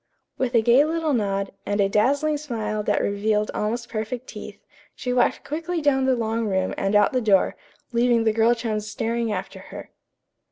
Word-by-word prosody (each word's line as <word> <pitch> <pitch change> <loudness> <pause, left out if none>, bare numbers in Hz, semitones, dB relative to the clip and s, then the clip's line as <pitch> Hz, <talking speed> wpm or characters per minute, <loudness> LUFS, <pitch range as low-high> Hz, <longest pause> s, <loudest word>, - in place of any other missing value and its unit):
With 250 -2 -1
a 225 - +4
gay 240 +5 +5
little 320 -1 -1
nod, 200 -4 -1
and 205 0 -2
a 200 - +4
dazzling 285 +9 +1
smile 225 -7 -3
that - - 0
revealed 210 +1 0
almost 230 +3 -2
perfect 230 +2 -4
teeth, - - -9 0.4
she 250 -1 -3
walked 245 -1 +1
quickly 330 +3 -3
down 275 -3 +2
the 260 -1 +3
long 225 -1 -1
room 190 -2 0
and 195 +1 -1
out 205 - +4
the 255 - +1
door, 200 -4 +3 0.4
leaving 235 -1 +2
the 220 -1 +2
girl 230 +2 +3
chums 215 -3 -3
staring 230 +1 -2
after - - -5
her. - - -9
230 Hz, 185 wpm, -23 LUFS, 210-255 Hz, 0.4 s, gay